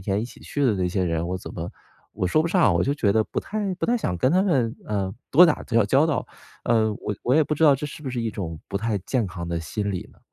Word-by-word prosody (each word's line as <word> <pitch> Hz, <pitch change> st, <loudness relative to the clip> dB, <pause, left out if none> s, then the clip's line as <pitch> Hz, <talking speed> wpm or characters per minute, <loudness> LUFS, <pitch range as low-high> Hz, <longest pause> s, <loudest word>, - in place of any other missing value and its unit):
天 95 Hz, +2 st, -1 dB
一 115 Hz, -, -2 dB
起 120 Hz, -, -12 dB
去 145 Hz, -, -2 dB
的 125 Hz, -, +4 dB
那 90 Hz, -2 st, 0 dB
些 95 Hz, +1 st, 0 dB
人， 85 Hz, 0 st, -1 dB
我 90 Hz, +1 st, -2 dB
怎 -, -, -9 dB
么 85 Hz, 0 st, -5 dB, 0.4 s
我 90 Hz, -, -2 dB
说 155 Hz, -, +3 dB
不 170 Hz, -, -1 dB
上， 170 Hz, -, +4 dB
我 85 Hz, -, +2 dB
就 140 Hz, -, +1 dB
觉 105 Hz, -9 st, +1 dB
得 110 Hz, -, +3 dB
不 -, -, -4 dB
太 205 Hz, -2 st, -2 dB
不 -, -, -2 dB
太 240 Hz, -, +2 dB
想 90 Hz, -, -2 dB
跟 130 Hz, -, +2 dB
他 185 Hz, +2 st, +4 dB
们， 130 Hz, -, +1 dB
呃， 100 Hz, -2 st, -2 dB, 0.2 s
多 175 Hz, +6 st, +8 dB
打 155 Hz, -, 0 dB
交 115 Hz, -2 st, +2 dB
交 135 Hz, +8 st, +4 dB
道。 155 Hz, -5 st, -1 dB, 0.4 s
呃， 110 Hz, -2 st, +2 dB
我 105 Hz, -, -4 dB
我 125 Hz, -, +1 dB
也 160 Hz, -, +5 dB
不 150 Hz, -, -1 dB
知 155 Hz, -, -2 dB
道 150 Hz, -, +8 dB
这 150 Hz, +3 st, -4 dB
是 150 Hz, -, -10 dB
不 135 Hz, -, -4 dB
是 125 Hz, -1 st, -3 dB
一 115 Hz, -2 st, -2 dB
种 85 Hz, -6 st, -5 dB
不 -, -, -4 dB
太 110 Hz, 0 st, -1 dB
健 115 Hz, +5 st, -1 dB
康 85 Hz, 0 st, -6 dB
的 85 Hz, -1 st, -2 dB
心 100 Hz, +6 st, -3 dB
理 90 Hz, -, -5 dB
呢？ -, -, -24 dB
110 Hz, 315 characters per minute, -24 LUFS, 95-145 Hz, 0.4 s, 多